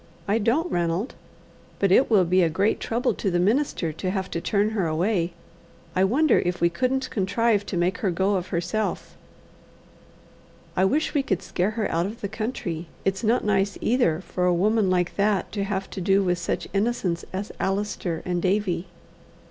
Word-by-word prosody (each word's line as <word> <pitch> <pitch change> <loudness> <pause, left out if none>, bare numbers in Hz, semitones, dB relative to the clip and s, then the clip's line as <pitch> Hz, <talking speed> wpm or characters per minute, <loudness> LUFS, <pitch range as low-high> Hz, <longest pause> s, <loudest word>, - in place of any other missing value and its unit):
I 210 +3 +2
don't, 265 - +1
Ranald. 175 +6 -1 0.6
But 195 -2 +2
it 260 - +5
will 200 -5 +5
be 185 +2 +3
a 170 - +3
great 195 +7 +1
trouble 240 +3 0
to 200 - -2
the 175 - +1
minister 195 - +1
to 185 +4 -3
have 190 0 -3
to 170 - -2
turn 205 +3 +1
her 200 -6 0
away. 170 +2 0 0.6
I 185 +1 +4
wonder 290 +10 +3
if 180 0 -2
we 170 - +3
couldn't 260 +7 -1
contrive 205 +1 +1
to 185 - -3
make 175 +2 0
her 200 - 0
go 190 +3 +1
of 185 -2 -1
herself. 200 +5 -2 1.6
I 190 - +3
wish 295 +11 +1
we 290 - +3
could 190 -9 -2
scare 180 +3 0
her 220 - +1
out 170 +3 +1
of 220 +3 -8
the 200 - -3
country. 200 -7 -4 0.2
It's 195 +1 0
not 230 +1 +2
nice 200 -1 +1
either 220 -9 +2
for 180 -1 -1
a 180 - +4
woman 210 +2 +2
like 180 -1 0
that 205 -1 +1
to 200 -2 -2
have 195 -1 -2
to 190 - -5
do 195 +2 +3
with 180 -1 0
such 170 - -2
innocents 195 -5 0
as 195 +2 -4
Allister 195 -4 -2
and 175 -1 -1
Davie." 185 -2 0
195 Hz, 190 wpm, -25 LUFS, 180-215 Hz, 1.6 s, it